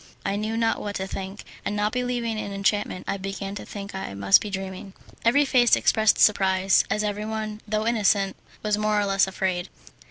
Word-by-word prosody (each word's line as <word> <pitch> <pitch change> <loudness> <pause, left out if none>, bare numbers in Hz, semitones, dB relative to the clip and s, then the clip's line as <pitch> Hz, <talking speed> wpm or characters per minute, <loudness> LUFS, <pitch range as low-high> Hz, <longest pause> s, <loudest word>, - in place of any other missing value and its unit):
I 195 - 0
knew 215 +2 -2
not 230 0 +1
what 205 -1 -4
to 190 - -2
think, 195 +1 -6 0.2
and 210 - -2
not 210 +1 0
believing 245 -3 -2
in 200 - -5
enchantment 200 -1 -1
I 200 - -1
began 195 0 -5
to 205 - -7
think 200 -1 -7
I 190 - -5
must 100 0 +5
be 210 - -5
dreaming. 190 0 -6 0.3
Every 255 +5 +4
face 245 -3 +5
expressed 220 -1 +3
surprise, 190 -2 +4
as 210 - 0
everyone, 215 +1 -3
though 215 +1 -1
innocent, 205 -4 +2 0.3
was 210 -1 +1
more 210 0 +2
or 205 - +1
less 195 -1 +3
afraid. 190 -1 -2
205 Hz, 190 wpm, -25 LUFS, 195-215 Hz, 0.3 s, must